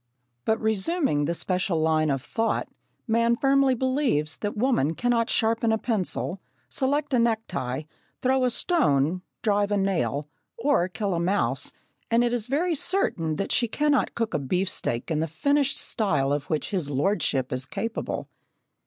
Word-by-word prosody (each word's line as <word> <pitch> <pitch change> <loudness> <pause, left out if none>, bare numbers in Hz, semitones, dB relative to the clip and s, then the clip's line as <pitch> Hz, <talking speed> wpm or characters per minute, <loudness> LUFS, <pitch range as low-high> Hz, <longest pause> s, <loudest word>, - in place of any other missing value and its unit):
But, 220 +1 +1
resuming 220 - +1
the 170 - 0
special 180 -1 0
line 155 -1 +2
of 135 -2 -1
thought, 225 +9 -1 0.4
man 230 0 +2
firmly 275 0 +3
believes 255 - 0
that 205 0 -4
woman 210 - +1
cannot 240 +1 +1
sharpen 225 0 +2
a 220 - +2
pencil, 195 -4 -1 0.3
select 285 +2 0
a 250 - +4
necktie, 185 - -1 0.4
throw 260 0 +2
a 250 - +3
stone, 180 - +1 0.2
drive 205 -2 +2
a 205 - +2
nail, 150 - 0 0.3
or 285 - +2
kill 200 +1 -2
a 170 - 0
mouse, 185 +4 0 0.4
and 230 +1 +3
it 240 0 +1
is 235 -2 -1
very 325 +7 +1
certain 180 - 0
that 195 - -3
she 235 - +3
cannot 290 +3 +1
cook 230 -2 -2
a - - +1
beef 180 +8 0
steak 120 -4 -2
in 155 - +1
the 160 - 0
finished 280 - +1
style 150 - 0
of 145 0 -2
which 155 -2 -2
his 180 -8 -1
lordship 140 -3 0
is 130 +1 -3
capable. 225 - -4
205 Hz, 160 wpm, -26 LUFS, 155-245 Hz, 0.4 s, a